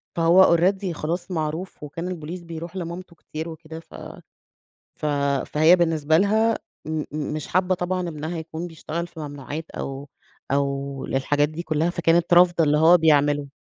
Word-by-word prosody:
فهو 170 Hz, +1 st, +5 dB
already 190 Hz, +1 st, +1 dB
خلاص 175 Hz, +4 st, -4 dB
معروف، 160 Hz, +1 st, -4 dB
وكان 165 Hz, +4 st, -5 dB
البوليس 175 Hz, 0 st, -6 dB
بيرُوح 170 Hz, +1 st, -8 dB
لمامته 175 Hz, 0 st, -6 dB
كتير 160 Hz, +1 st, -7 dB
وكده، 160 Hz, 0 st, -9 dB
ف -, -, -19 dB, 1.1 s
ف -, -, -3 dB, 0.4 s
فهي 160 Hz, +4 st, +5 dB
بالنسبة 160 Hz, -2 st, +2 dB
لها 220 Hz, +4 st, +2 dB, 0.3 s
م 155 Hz, -1 st, -3 dB
م 150 Hz, -1 st, -3 dB
مش 155 Hz, -2 st, -5 dB
حابَّة 185 Hz, +1 st, +2 dB
طبعًا 180 Hz, 0 st, -2 dB
ابنها 160 Hz, +2 st, -5 dB
يكون 160 Hz, +1 st, -6 dB
بيشتغل 170 Hz, 0 st, -5 dB
في 160 Hz, -, -12 dB
ممنوعات، 145 Hz, +2 st, -7 dB
أو 135 Hz, +1 st, -6 dB, 0.4 s
أو 140 Hz, -1 st, -1 dB
للحاجات 145 Hz, +2 st, +1 dB
دي 155 Hz, +3 st, -6 dB
كلّها، 160 Hz, +1 st, 0 dB
فكانت 170 Hz, 0 st, +2 dB
رافضة 175 Hz, -1 st, +5 dB
اللي 150 Hz, 0 st, +3 dB
هو 165 Hz, +3 st, +7 dB
بيعمله. 145 Hz, -3 st, +3 dB
165 Hz, 155 wpm, -23 LUFS, 150-175 Hz, 1.1 s, هو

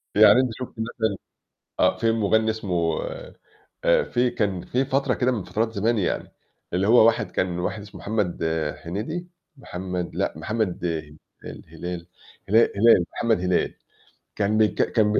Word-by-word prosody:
يعني -, -, +7 dB
أنتِ 130 Hz, -, 0 dB
شُفتِ 125 Hz, -, -6 dB
مثلًا 110 Hz, -1 st, -1 dB, 0.7 s
آه، -, -, +4 dB
في 115 Hz, -1 st, +2 dB
مغنّي 110 Hz, 0 st, +2 dB
اسمه 90 Hz, -7 st, -1 dB, 0.8 s
آآ -, -, +4 dB
في 125 Hz, 0 st, +1 dB
كان 100 Hz, -6 st, -1 dB
في 130 Hz, +2 st, 0 dB
فَترة 135 Hz, -1 st, +1 dB
كده 125 Hz, 0 st, +1 dB
من 105 Hz, -7 st, -2 dB
فَترات 110 Hz, +5 st, -1 dB
زمان 110 Hz, +3 st, +1 dB
يعني 95 Hz, -, -2 dB, 0.4 s
اللي 95 Hz, +3 st, +1 dB
هو 115 Hz, -1 st, +7 dB
واحد 115 Hz, -1 st, +2 dB
كان 90 Hz, -1 st, -1 dB
واحد 105 Hz, +4 st, -3 dB
اسمه 100 Hz, -, -11 dB
محمد 105 Hz, -6 st, -1 dB, 0.4 s
هنيدي 125 Hz, -, -4 dB, 0.3 s
محمد 90 Hz, -6 st, -5 dB
لأ، -, -, -1 dB
محمد 105 Hz, 0 st, -2 dB
أي 80 Hz, -3 st, -4 dB, 0.3 s
الهلال 90 Hz, -1 st, -7 dB, 0.4 s
هلا 110 Hz, +3 st, +6 dB, 0.2 s
هلال، 105 Hz, -4 st, +5 dB
محمد 115 Hz, -4 st, +1 dB
هلال 90 Hz, -1 st, +1 dB, 0.6 s
كان 105 Hz, +1 st, +1 dB
بيك 110 Hz, -1 st, +2 dB
كان 105 Hz, -2 st, +3 dB
بي -, -, +3 dB
105 Hz, 155 wpm, -24 LUFS, 90-115 Hz, 0.8 s, يعني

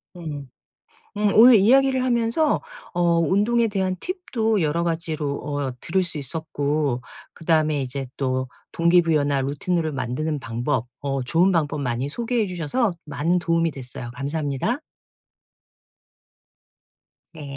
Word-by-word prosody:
음. 150 Hz, -6 st, -7 dB, 0.7 s
음 210 Hz, -1 st, +2 dB
오늘 240 Hz, +3 st, +9 dB
이야기를 260 Hz, +5 st, +4 dB
하면서 245 Hz, +5 st, +1 dB, 0.3 s
어 175 Hz, -, -2 dB, 0.2 s
운동에 210 Hz, +7 st, +2 dB
대한 190 Hz, -2 st, -1 dB
팁도 235 Hz, -, -1 dB
여러 165 Hz, +1 st, 0 dB
가지로 160 Hz, -4 st, -2 dB
어 145 Hz, -2 st, -3 dB
들을 190 Hz, +3 st, +1 dB
수 170 Hz, -4 st, -3 dB
있었고 145 Hz, -2 st, -1 dB, 0.3 s
그다음에 155 Hz, -3 st, +1 dB
이제 135 Hz, +1 st, -3 dB
또 130 Hz, -1 st, -1 dB, 0.2 s
동기부여나 165 Hz, -5 st, +3 dB
루틴으로 155 Hz, +4 st, -1 dB
만드는 140 Hz, +4 st, -2 dB
방법 120 Hz, +2 st, -2 dB
어 135 Hz, -1 st, -2 dB
좋은 170 Hz, +9 st, +3 dB
방법 150 Hz, -3 st, 0 dB
많이 125 Hz, 0 st, -2 dB
소개해 235 Hz, +4 st, -1 dB
주셔서 185 Hz, -, -1 dB
많은 155 Hz, +4 st, 0 dB
도움이 165 Hz, 0 st, +1 dB
됐어요. 125 Hz, -3 st, -8 dB
감사합니다. 145 Hz, -, -2 dB, 2.5 s
네. 155 Hz, -3 st, -9 dB
160 Hz, 270 characters per minute, -23 LUFS, 140-190 Hz, 2.5 s, 오늘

